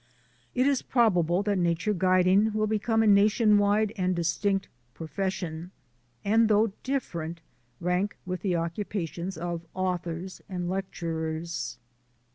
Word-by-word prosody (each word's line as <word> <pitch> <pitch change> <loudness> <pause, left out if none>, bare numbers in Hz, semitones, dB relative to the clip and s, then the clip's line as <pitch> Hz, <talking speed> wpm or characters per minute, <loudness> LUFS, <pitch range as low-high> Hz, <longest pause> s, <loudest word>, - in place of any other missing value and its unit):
It 255 +1 +3
is 280 -2 +2
probable 185 -7 +2
that 205 -2 0
nature 175 +4 +1
guiding 185 +3 +3
will 215 0 +1
become 220 +1 +1
a - - +2
nation 210 +1 +5
wide 205 +1 +2
and 185 -3 0
distinct 190 +4 0 0.3
profession, 175 0 -4 0.6
and, 225 +2 +4
though 215 0 +4
different, 170 - -3 0.4
rank 180 +4 0
with 185 -1 -4
the 185 -2 0
occupations 170 +1 -3
of 170 0 -3
authors 180 -1 -3
and 180 -2 -3
lecturers. 165 -7 -3
185 Hz, 120 wpm, -27 LUFS, 170-210 Hz, 0.6 s, nation